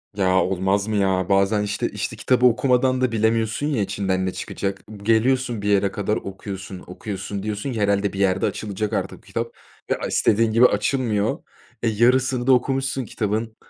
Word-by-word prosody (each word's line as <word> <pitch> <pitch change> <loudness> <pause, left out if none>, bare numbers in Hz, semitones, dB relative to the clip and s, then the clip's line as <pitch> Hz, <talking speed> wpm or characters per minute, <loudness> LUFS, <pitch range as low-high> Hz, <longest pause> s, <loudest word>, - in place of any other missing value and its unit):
Ya, 95 -2 +3
olmaz 95 +2 0
mı 110 - -1
ya? 95 -2 +1
Bazen, 100 +2 +3
işte 105 0 -2
işte, - - -4
kitabı 125 -1 +2
okumadan 130 +1 +3
da 130 -2 +2
bilemiyorsun, 115 +4 +1
ya, 135 -8 0
içinden 95 -1 -1
ne 95 - -1
çıkacak? 100 0 -4
B 105 -2 -11
geliyorsun 120 +1 +2
bir 105 - -1
yere 100 -1 +3
kadar 105 +1 -1
okuyorsun, 95 -1 -7
okuyorsun, 100 +1 -6
diyorsun 105 +5 -3
ki 110 - -3
herhâlde 100 0 +1
bir 100 - -5
yerde 95 -1 +2
açılacak 105 0 -3
artık - - -2
bu - - -21
kitap - - -4 0.4
ve, - - +1
a - - -4
istediğin 110 +1 +2
gibi 115 +3 +5
açılmıyor. 110 -1 +1 0.4
E, 115 - +2
yarısını 125 +3 +2
da 130 - +7
okumuşsun 135 0 0
kitabın, 110 +2 -2
105 Hz, 180 wpm, -22 LUFS, 100-120 Hz, 0.4 s, da